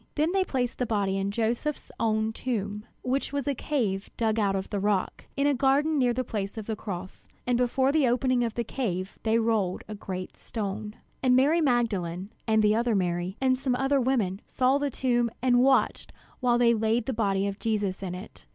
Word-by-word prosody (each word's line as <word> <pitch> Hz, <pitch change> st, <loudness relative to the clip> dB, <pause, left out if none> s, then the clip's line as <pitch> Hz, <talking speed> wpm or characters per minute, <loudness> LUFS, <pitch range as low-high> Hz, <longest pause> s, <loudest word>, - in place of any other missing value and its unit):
Then 310 Hz, +3 st, +2 dB
they 385 Hz, 0 st, +2 dB
placed 250 Hz, -8 st, -2 dB
the 250 Hz, -, 0 dB
body 200 Hz, -3 st, 0 dB
in 195 Hz, 0 st, -1 dB
Joseph's 235 Hz, +7 st, -2 dB
own 220 Hz, -1 st, +2 dB
new 220 Hz, -, -1 dB
tomb, 210 Hz, -3 st, -3 dB, 0.2 s
which 265 Hz, +2 st, -1 dB
was 285 Hz, -1 st, -2 dB
a 285 Hz, -, +2 dB
cave 225 Hz, -9 st, -1 dB
dug 225 Hz, -1 st, +1 dB
out 200 Hz, -2 st, +2 dB
of 190 Hz, 0 st, -4 dB
the 205 Hz, -, -1 dB
rock, 200 Hz, -1 st, -1 dB
in 280 Hz, -, +2 dB
a 290 Hz, -, +4 dB
garden 280 Hz, +4 st, +2 dB
near 250 Hz, -2 st, +3 dB
the 255 Hz, +2 st, -1 dB
place 205 Hz, -3 st, -4 dB
of 220 Hz, -, -5 dB
the 220 Hz, -, -2 dB
cross. 185 Hz, -3 st, -7 dB, 0.2 s
And 245 Hz, -, +2 dB
before 250 Hz, +2 st, +2 dB
the 295 Hz, -3 st, +3 dB
opening 250 Hz, 0 st, +2 dB
of 230 Hz, -2 st, -2 dB
the 235 Hz, -, 0 dB
cave 195 Hz, -6 st, -3 dB
they 225 Hz, 0 st, +2 dB
rolled 220 Hz, -5 st, 0 dB
a 215 Hz, -, -6 dB
great 185 Hz, -3 st, -6 dB
stone. 210 Hz, 0 st, -4 dB, 0.3 s
And 255 Hz, -1 st, +4 dB
Mary 295 Hz, +6 st, +4 dB
Magdalene, 200 Hz, -, 0 dB, 0.2 s
and 220 Hz, -1 st, +3 dB
the 210 Hz, 0 st, +4 dB
other 230 Hz, 0 st, +1 dB
Mary, 180 Hz, +1 st, -1 dB
and 260 Hz, -1 st, +2 dB
some 260 Hz, -2 st, 0 dB
other 270 Hz, +1 st, +2 dB
women, 225 Hz, -7 st, 0 dB
saw 260 Hz, +2 st, +2 dB
the 285 Hz, 0 st, 0 dB
tomb, 240 Hz, -2 st, +1 dB
and 245 Hz, -1 st, +3 dB
watched 270 Hz, +1 st, +2 dB, 0.3 s
while 245 Hz, -2 st, +3 dB
they 235 Hz, -1 st, +5 dB
laid 220 Hz, +1 st, +1 dB
the 265 Hz, -, -1 dB
body 200 Hz, -3 st, +1 dB
of 200 Hz, 0 st, -3 dB
Jesus 205 Hz, -4 st, -1 dB
in 180 Hz, -2 st, -4 dB
it. 185 Hz, +3 st, -11 dB
230 Hz, 210 wpm, -27 LUFS, 200-255 Hz, 0.3 s, they